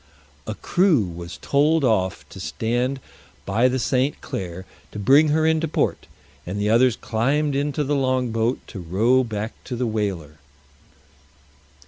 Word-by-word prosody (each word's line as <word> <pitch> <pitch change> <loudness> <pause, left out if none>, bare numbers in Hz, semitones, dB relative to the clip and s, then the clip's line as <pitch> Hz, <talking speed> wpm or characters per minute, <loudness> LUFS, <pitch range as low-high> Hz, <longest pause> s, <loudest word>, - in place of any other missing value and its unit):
A - - -3
crew 175 - +2
was 85 -1 -7
told 150 +2 +2
off 95 -7 0
to - - -11
stand 120 +4 -1 0.5
by 110 +6 +2
the 130 +1 0
St. 130 +3 0
Clare 90 0 -6 0.3
to - - -8
bring 140 +9 +5
her 155 +1 +2
into 160 0 +2
port, 150 - -1 0.4
and 95 +4 -5
the 105 +1 +1
others 120 +1 +4
climbed 140 +7 0
into 145 +1 0
the 145 +1 -1
long 130 -3 0
boat 115 +3 0
to 100 - -7
row 110 +10 +2
back 110 -1 -4
to 125 - -4
the 125 +1 -1
whaler. 95 -9 -3
120 Hz, 150 wpm, -23 LUFS, 105-140 Hz, 0.5 s, bring